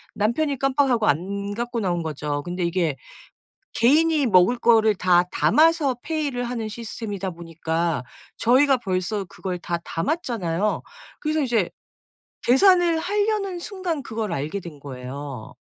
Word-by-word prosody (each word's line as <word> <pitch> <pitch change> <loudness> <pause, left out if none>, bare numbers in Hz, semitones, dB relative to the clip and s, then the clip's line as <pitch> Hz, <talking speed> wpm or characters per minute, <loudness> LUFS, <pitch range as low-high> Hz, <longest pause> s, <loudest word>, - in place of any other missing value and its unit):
남편이 270 +7 0
깜빡하고 265 -4 +2
안 200 +6 -1
갖고 240 +1 -3
나온 175 -3 0
거죠. 145 -2 -3
근데 175 0 -3
이게 170 -4 0 0.8
개인이 300 +4 +4
먹을 190 +4 +5
거를 220 -2 +4
다 180 -1 +4
담아서 310 -4 +3
페이를 290 -6 -2
하는 235 -2 -3
시스템이다 215 -3 -5
보니까 165 -3 -2 0.3
저희가 260 +3 +4
벌써 195 -1 -2
그걸 180 +1 -5
다 170 0 -2
담았잖아요. 205 - -1 0.4
그래서 310 0 0
이제 230 -8 +1 0.7
계산을 345 +4 +5
하려는 405 0 0
순간 350 -6 -4
그걸 220 -5 -4
알게 155 +7 -3
된 155 -5 -10
거예요. 135 -2 -7
220 Hz, 290 characters per minute, -23 LUFS, 175-280 Hz, 0.8 s, 먹을